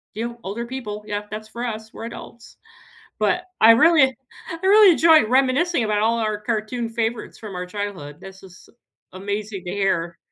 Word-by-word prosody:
you, 235 +2 -5
older 220 +5 -5
people. 215 -5 -6
Yeah, 205 -1 -3
that's 215 +1 -7
for 235 +2 -7
us, 220 -2 -5
we're 225 - -8
adults." 235 0 -11 0.6
But 355 +12 0 0.2
I 225 - +9
really 310 +5 +5 0.5
I 330 - -6
really 410 -1 +7
enjoy 320 -4 +5
reminiscing 265 +3 +2
about 210 -1 0
all 230 +2 +1
our 215 -2 -1
cartoon 225 +2 -3
favorites 230 0 -3
from 210 -4 -9
our 180 - -4
childhood. 180 -7 -6
This 190 0 -12
is 185 -1 -16 0.5
amazing 200 +1 -5
to 180 - -5
hear. 175 -4 -1
220 Hz, 170 wpm, -22 LUFS, 205-240 Hz, 0.6 s, I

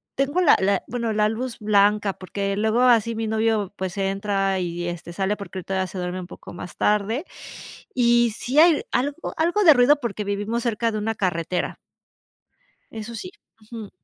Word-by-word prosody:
tengo 275 +6 0
la 355 -5 +6
la 195 0 +2
bueno, 235 -2 -2
la 210 0 +2
luz 230 +2 -4
blanca 205 -1 +3
porque 195 +2 -4
luego 220 +3 +1
así 230 -2 +4
mi 225 0 -2
novio 220 -2 0
pues 190 0 -5
entra 195 0 0
y 175 0 -3
este 175 0 -6
sale 195 +3 -1
porque 200 -2 -9
ahorita 190 +1 -4
ya 190 0 0
se 185 - -9
duerme 180 0 -3
un 175 - -9
poco - - -11
más 175 0 -9
tarde 210 - +1 0.7
y 240 -1 +4
sí 265 +5 +1
hay 325 -2 +5
algo 285 +5 -2
algo 345 +6 +2
de 315 - +9
ruido 270 +3 +5
porque 215 -3 -3
vivimos 205 +4 -2
cerca 230 -1 0
de 215 - -2
una 225 +1 -2
carretera. 180 -2 -2 1.1
Eso 225 +1 -7
sí, 230 - -6 0.4
ujú. 220 -3 -7
210 Hz, 180 wpm, -23 LUFS, 195-235 Hz, 1.1 s, de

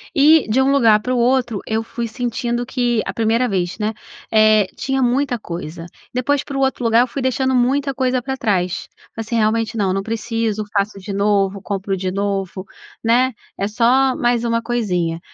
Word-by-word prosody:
E 300 0 +5
de 245 +5 +2
um 270 +1 +3
lugar 225 -6 +5
para 250 +4 -2
o - - 0
outro, 240 -3 +1
eu 220 +1 -1
fui 235 +1 -4
sentindo 240 0 -2
que 240 -3 0
a - - -4
primeira 230 +2 +1
vez 180 -3 -2
né, 215 +1 -1 0.4
eh, 215 -1 +5
tinha 270 +1 -1
muita 250 0 +1
coisa, 170 -4 -7 0.3
depois, 275 +3 0
para 280 -2 -6
o - - 0
outro 265 -2 0
lugar, 230 +1 +4
eu 250 - +2
fui 270 +3 -5
deixando 260 +1 0
muita 270 +3 +1
coisa 255 -1 0
pra 265 +2 -4
trás. 190 -9 -1 0.3
Assim, 225 +1 -4
realmente 225 +1 +1
não 195 -3 +1
não 195 - -1
preciso, 225 0 -2
faço 200 0 0
de 200 +1 -6
novo, 200 -1 +1
compro 195 -1 -3
de 185 0 -3
novo, 195 -1 -3 0.4
né, 245 +3 +3 0.3
é 200 - 0
só 250 +5 +3
mais 240 -1 +1
uma 230 -1 +1
coisinha. 180 -9 -1
230 Hz, 190 wpm, -19 LUFS, 205-255 Hz, 0.4 s, E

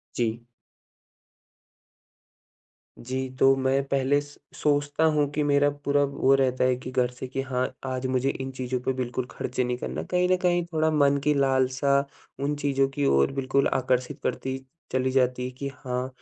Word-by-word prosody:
जी। 115 -1 -1 2.6
जी। 130 +2 -3
तो 135 0 +6
मैं 135 +1 +1
पहले 140 +1 +2
स 145 0 -13 0.2
सोचता 145 +1 +1
हूँ 145 -1 +2
कि 150 - 0
मेरा 145 0 +3 0.2
पूरा 145 0 +3
वो 135 -1 +2
रहता 130 -2 +2
है 125 -1 +3
कि 130 0 -7
घर 125 -1 +1
से 125 +1 -7
कि 135 +1 -3
हाँ, 130 -1 -1 0.2
आज 130 0 -2
मुझे 130 +1 +1
इन 135 -1 -5
चीज़ों 130 -1 -3
पे 130 - -1
बिल्कुल 125 -1 -3
खर्चे 125 0 -2
नहीं 125 0 -1
करना। - - -4
कहीं 180 0 +1
न 185 - +4
कहीं 175 -1 +2
थोड़ा 160 0 +2
मन 140 -2 +3
की 150 0 +3
लालसा 135 0 +2 0.5
उन 145 - 0
चीज़ों 135 -2 +1
की 140 +1 -2
ओर 70 - +3
बिल्कुल 135 0 +1
आकर्षित 125 -1 0
करती 130 0 -2 0.3
चली 130 0 +1
जाती 125 -1 +1
कि 140 - -3
हाँ, 130 -2 -4
135 Hz, 170 wpm, -26 LUFS, 130-140 Hz, 2.6 s, तो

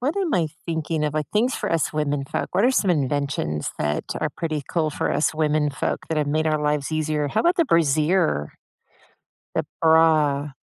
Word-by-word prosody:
what 285 +9 -1
am 375 -5 0
I 170 -3 +2 0.2
thinking 160 -1 -2
of? 150 - -1
Like, 155 -1 -2
things 235 +5 +1
for - - -3
us 165 - 0
women 145 -2 -1
folk. - - -4
What 200 - +3
are 255 - +5
some 205 -7 +1
inventions 140 - -1
that 75 0 -1 0.2
are - - 0
pretty 155 -3 -2
cool 160 -3 0
for - - -2
us 160 - +1
women 150 -1 +1
folk - - -2
that 160 - -1
have 150 -1 0
made 155 +2 0
our 155 -1 +1
lives 150 0 -1
easier? 155 -1 0
How 140 - 0
about 345 +1 +2
the 335 - +3
brassiere? 155 - +2 1.0
The - - 0 0.2
bra. 155 -3 +4
155 Hz, 200 wpm, -23 LUFS, 145-165 Hz, 1.0 s, are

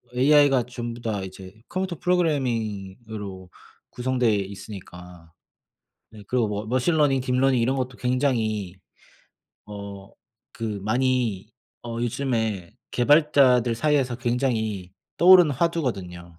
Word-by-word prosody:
AI가 140 -1 +5
전부 120 -1 -7
다 110 -4 -2
이제 95 0 -10
컴퓨터 185 -3 -3
프로그래밍으로 110 - -2 0.4
구성돼 125 -2 0
있으니까 90 -4 -8 0.8
네 110 -1 -13
그리고 125 -3 +1
뭐 105 +1 -4
머신러닝, 135 +3 +2
딥러닝 130 0 +2
이런 130 +4 +1
것도 125 -1 -3
굉장히 115 -7 0 0.9
어 100 -1 -9 0.4
그 115 - -6 0.2
많이 115 -3 0 0.3
어 120 - -6
요즘에 110 -6 -2 0.2
개발자들 130 -3 +4
사이에서 135 -2 +1
굉장히 115 -6 -2 0.2
떠오르는 180 -2 +7
화두거든요. 100 - -3
120 Hz, 265 characters per minute, -24 LUFS, 100-130 Hz, 0.9 s, 떠오르는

